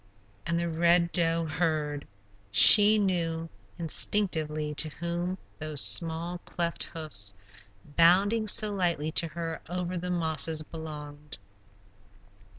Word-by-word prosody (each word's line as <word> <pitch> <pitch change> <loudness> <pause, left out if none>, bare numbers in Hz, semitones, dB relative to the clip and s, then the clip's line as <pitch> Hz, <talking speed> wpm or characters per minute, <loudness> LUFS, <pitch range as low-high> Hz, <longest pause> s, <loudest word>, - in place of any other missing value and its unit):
And 170 - -1
the 170 - -3
Red 170 +1 +1
Doe 165 -1 0
heard; 155 -2 -3 0.4
she 210 - +8
knew 165 -5 -2 0.3
instinctively 155 -3 +1
to 155 +1 -1
whom 170 +3 -5 0.2
those 155 -2 -3
small, 170 +3 0
cleft 170 -1 -5
hoofs, 105 -12 -2 0.5
bounding 185 +8 +2
so 210 0 +2
lightly 170 -5 -2
to 165 - 0
her 165 0 -7
over 180 0 -4
the 180 +1 -6
mosses, 160 -2 0
belonged. 150 -2 -10
165 Hz, 110 wpm, -27 LUFS, 155-175 Hz, 0.5 s, she